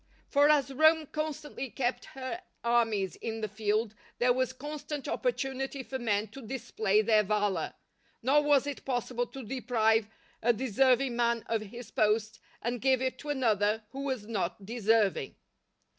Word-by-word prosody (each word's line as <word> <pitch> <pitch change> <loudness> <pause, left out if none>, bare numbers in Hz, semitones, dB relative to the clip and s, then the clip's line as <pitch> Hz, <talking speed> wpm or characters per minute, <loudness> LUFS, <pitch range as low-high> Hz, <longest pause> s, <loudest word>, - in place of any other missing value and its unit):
For 285 +1 +5
as 280 -3 +3
Rome 315 +2 +5
constantly 305 -3 -4
kept 245 +1 -2
her 265 +7 -4 0.2
armies 225 -6 +1
in 225 -1 -4
the 215 - -1
field, 215 +1 -1 0.2
there 245 0 +4
was 255 0 0
constant 295 +2 -6
opportunity 270 - -2
for 265 +1 -5
men 215 -3 0
to 270 +6 -10
display 220 -4 0
their 215 0 +5
valour, 205 -4 0 0.5
nor 280 +4 +5
was 290 -2 +4
it 285 -2 -5
possible 245 -1 -1
to 270 - -9
deprive 225 -3 +1 0.3
a 240 +1 +4
deserving 255 +2 +2
man 235 -1 +1
of 225 -1 -1
his 225 +2 -9
post 215 +1 +1 0.2
and 240 0 -2
give 265 -1 +3
it 260 0 -2
to 295 - -8
another 220 -5 +1
who 275 - -6
was 260 -6 -2
not 195 -3 -3
deserving. 220 - +1
240 Hz, 155 wpm, -30 LUFS, 215-270 Hz, 0.5 s, For